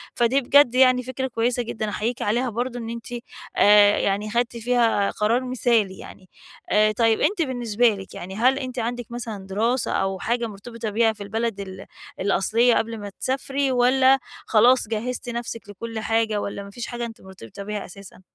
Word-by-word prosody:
فدي 245 +3 +2
بجد 265 -1 +5
يعني 255 -1 +5
فكرة 260 +1 -3
كويّسة 240 0 0
جدًا 220 -2 -4
أحييكِ 225 +4 -3
عليها 240 +4 0
برضه 245 +2 -3
إن 230 -1 -6
أنتِ، 230 0 -7 0.5
آآ 205 0 +6
يعني 200 +2 0
خدتِ 240 0 0
فيها 230 -3 +2
قرار 230 +4 +1
مثالي 235 -6 +1
يعني، 185 -2 -12 0.4
آآ 215 0 +4
طيب 225 +1 +2
أنتِ 400 -3 +1
بالنسبة 245 -5 +1
لِك 195 -3 -6
يعني، 190 +2 -7
هل 255 +5 +3
أنتِ 255 -2 -5
عندِك 240 +1 -3
مثلًا 225 -5 -6
دراسة 230 +6 0
أو 195 -1 -1
حاجة 235 +4 -1
مرتبطة 225 +2 -7
بيها 220 +1 +2
في 210 -1 -9
البلد 220 +1 -2
ال 190 -1 -8 0.3
الأصلية 220 +5 +2
قبل 225 0 -1
ما 205 - -6
تسافري، 270 +1 -1
والّا 260 +2 +4 0.3
خلاص 240 +1 +4
جهزتِ 240 +3 -4
نفسِك 235 -3 -5
لكلّ 225 +3 -6
حاجة، 220 -1 0
والّا 200 0 -5
ما 200 - -10
فيش 235 +4 -7
حاجة 240 -1 -4
أنتِ 225 -1 -10
مرتبطة 190 - -11
بيها 210 0 -4
أساسًا؟ 195 0 -13
230 Hz, 175 wpm, -23 LUFS, 205-245 Hz, 0.5 s, آآ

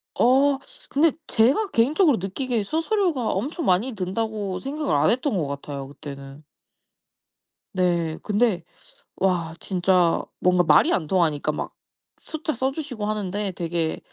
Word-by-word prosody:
어 270 +3 +4 0.3
근데 305 +2 +4 0.2
제가 270 - +3
개인적으로 285 - +3
느끼기에 225 +5 -2
'수수료가 325 - 0
엄청 290 - -2
많이 190 +8 +2
든다.'고 200 0 -3
생각을 290 - -2
안 145 +2 +3
했던 250 -3 0
것 155 - -1
같아요 140 -1 -6
그때는. 140 0 -10 1.3
네. 170 -3 0
근데 210 -2 +1 0.5
와 175 -4 0
진짜 180 -2 +2 0.2
뭔가 180 0 +3
말이 310 - +5
안 160 - -1
통하니까 160 -5 +1
막 - - -5 0.5
숫자 315 0 -4
써 260 +3 0
주시고 270 -8 -5
하는데 205 -1 -2
되게 170 -2 -2
205 Hz, 275 characters per minute, -24 LUFS, 175-270 Hz, 1.3 s, 말이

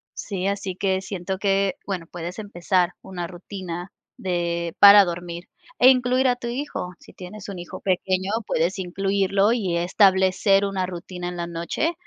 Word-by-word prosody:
sí, 195 -3 -3
así 200 -2 -2
que 190 0 0
siento 190 -1 -4
que, 195 -1 +1
bueno, 180 -4 -4
puedes 175 +3 -6
empezar 185 -3 0
una 180 -2 -6
rutina 180 0 -7 0.3
de 170 -2 -2
para 200 0 +10
dormir 175 0 -6 0.3
e 255 - +8
incluir 255 0 +3
a 250 - +3
tu 245 -1 -7
hijo. 245 -8 -4
Si - - -17
tienes 190 +2 -10
un 195 - -6
hijo 175 -1 -8
pequeño, 185 0 0 0.2
puedes 175 +2 0
incluirlo 195 +3 +1
y 195 -8 -1
establecer 190 +2 +3
una 195 -2 -1
rutina 180 0 -6
en 180 - -7
la 170 - -3
noche, 170 - -2
190 Hz, 160 wpm, -23 LUFS, 175-200 Hz, 0.3 s, para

